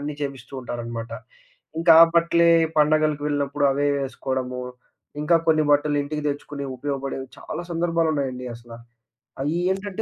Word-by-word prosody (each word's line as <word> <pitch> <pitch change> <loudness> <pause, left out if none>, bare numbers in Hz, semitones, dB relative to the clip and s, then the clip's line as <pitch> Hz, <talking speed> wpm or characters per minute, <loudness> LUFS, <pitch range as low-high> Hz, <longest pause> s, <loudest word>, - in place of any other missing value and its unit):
అన్నీ 145 +1 -4
చేపిస్తూ 135 -3 -6
ఉంటారనమాట. 120 -2 -6 0.7
ఇంక 165 +1 -3
ఆ - - +11
బట్టలే 170 0 +4 0.3
పండగలకి 155 -1 +3
వెళ్ళినప్పుడు 145 0 -1
అవే 145 +1 0 0.2
ఏసుకోడము, 130 -1 -4 0.6
ఇంకా 150 +3 +4
కొన్ని 155 -1 +4
బట్టలు 145 0 +3
ఇంటికి 150 +1 -4
తెచ్చుకుని 145 0 -5
ఉపయోగపడేవి 135 -1 -4
చాలా - - -6
సందర్భాలున్నాయండి 160 -6 -1
అసల. 120 0 -14 0.7
అ‌య్యీ 160 +5 -1
ఏంటంటే, 195 +2 -4
145 Hz, 125 wpm, -23 LUFS, 135-160 Hz, 0.7 s, ఆ